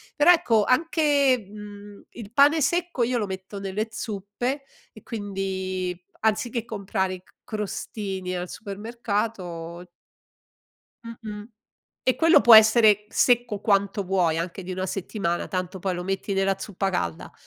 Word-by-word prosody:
però, 305 +4 +6
ecco, 235 -12 +3
anche, 280 - +2
mhmm, 205 -1 -11
il 220 -3 -10
pane 290 +4 +5
secco 345 -1 0
io 245 +1 0
lo 215 - 0
metto 190 +1 -7
nelle 200 +3 -3
zuppe 220 +7 -4 0.3
e 215 - -14
quindi, 190 -3 -4 0.2
anziché 225 +2 0
comprare 195 -3 -2
i 180 - -14
c - - -27
crostini 195 -3 -4
al 180 0 -4
supermercato 200 -6 -4 1.2
Mh-mh. 215 -2 -8 0.6
E 255 - +2
quello 330 +1 +6
può 235 -2 +9
essere 220 -1 +6
secco 240 -4 +2
quanto 200 -1 +1
vuoi, 180 -4 +1
anche 175 +3 -4
di 185 - -6
una 185 +1 -2
settimana, 185 -2 -3
tanto 185 0 -3
poi 190 0 -1
lo 175 - -4
metti 195 +1 -3
nella 195 0 +1
zuppa 195 -1 -3
calda 85 - -3
205 Hz, 135 wpm, -25 LUFS, 190-230 Hz, 1.2 s, può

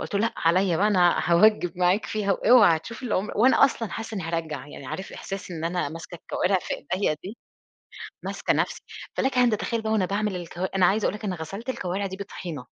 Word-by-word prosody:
قُلت - - -6
له 200 - +2
لأ 230 +1 +1
عليّا 175 +1 +2
بقى 205 - +3
أنا 180 -4 +4
هاوجّب 180 +2 +4
معاك 180 +4 +2
فيها 205 -2 0
واوعى 215 -6 +6
هتشوف 230 +10 -9
اللي 235 -4 -1
عُمر 200 +4 -1
وأنا 260 +4 +6
أصلًا 230 -6 -1
حاسّة 225 0 -5
إني 190 - -3
هارجّع، 165 -3 -3
يعني 140 -2 -10
عارف 190 +8 -6
إحساس 195 -1 -7
إن 165 -2 -5
أنا 175 -3 -1
ماسكة 165 +3 -9
الكوارِع 185 +3 0
في - - -3 0.2
ايديّا 185 -5 0
دي، 210 +5 -7 0.9
ماسكة - - -1
نَفْسي، - - -1 0.4
فلَكَ 265 -1 0
أن 245 -1 +5
تتخيّل 225 +1 -1
بقى 220 0 -2
وأنا 205 -4 +2
باعمل 205 0 -1
الكوا 175 +2 -5
أنا 185 -2 +4
عايزة 205 +4 +2
أقول - - 0
لك 210 - -7
أنا 185 -3 -2
غَسلت 195 +10 -7
الكوارِع 195 -4 -2
دي 190 0 -5
بطحينة، 170 -9 -7
195 Hz, 215 wpm, -25 LUFS, 175-215 Hz, 0.9 s, واوعى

